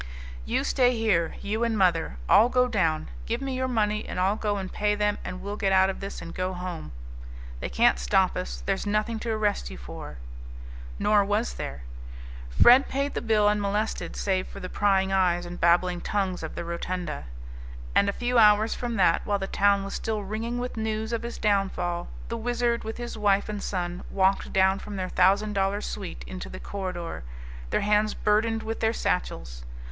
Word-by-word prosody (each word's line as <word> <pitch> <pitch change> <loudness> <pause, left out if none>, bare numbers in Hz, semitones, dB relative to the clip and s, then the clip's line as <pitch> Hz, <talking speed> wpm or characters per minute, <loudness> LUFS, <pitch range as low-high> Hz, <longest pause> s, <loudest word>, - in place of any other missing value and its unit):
"You - - 0
stay 250 -2 +2
here, 195 -7 +1
you 215 +3 -1
and 230 -2 0
mother. 170 - +2
I'll 230 +3 +6
go 250 0 +3
down. 160 -9 0 0.2
Give 235 +1 -1
me 270 -1 -3
your 260 0 -1
money 215 -3 0
and - - -5
I'll 190 +3 +2
go 210 -2 -1
and 190 -1 -5
pay 210 0 +1
them 210 0 0
and 185 0 -6
we'll 205 +1 -4
get 195 -3 +1
out 190 0 +5
of - - -9
this 195 -3 -6
and 170 - -8
go 185 0 -2
home. 180 - -6 0.7
They 60 - -4
can't 60 0 +3
stop - - +2
us; - - -5
there's - - -1
nothing 215 +2 0
to 235 - -4
arrest 210 - 0
you 65 - -8
for." - - -9 0.8
Nor 210 - +4
was 205 +4 0
there. 70 -2 -6 0.7
Fred 245 - +6
paid 280 +1 -1
the - - -2
bill 215 -2 +3
unmolested, 210 +1 -1
save 190 -2 0
for - - -9
the 185 - -6
prying 195 -2 +2
eyes 180 -2 +2
and 175 0 -8
babbling 175 +1 +3
tongues 190 -3 -1
of 160 - -6
the - - -4
rotunda. 170 - -4 0.7
And 200 - +4
a - - +2
few 245 +3 +1
hours 215 0 +5
from 240 -2 -3
that, - - +3
while 205 -1 0
the 195 - -3
town 200 0 +2
was 195 - -6
still 215 -2 -2
ringing 220 +4 -3
with 245 -1 -4
news 220 +1 -2
of 230 - -1
his 235 0 -6
downfall, 190 -4 0 0.2
the 230 - -3
Wizard 240 0 0
with 220 0 -5
his 240 -2 -6
wife 200 -1 +2
and 210 -1 -4
son 180 -2 -3
walked 195 0 +1
down 190 0 +3
from 205 - -7
their 185 -1 -3
thousand 200 +3 +3
dollar 195 0 +1
suite 200 -2 -6
into 185 -1 -7
the 185 - -8
corridor, 180 - -5 0.5
their - - +1
hands 210 +1 +2
burdened 220 +1 +1
with 225 0 -4
their 225 0 +1
satchels. - - -2
200 Hz, 195 wpm, -26 LUFS, 185-220 Hz, 0.8 s, I'll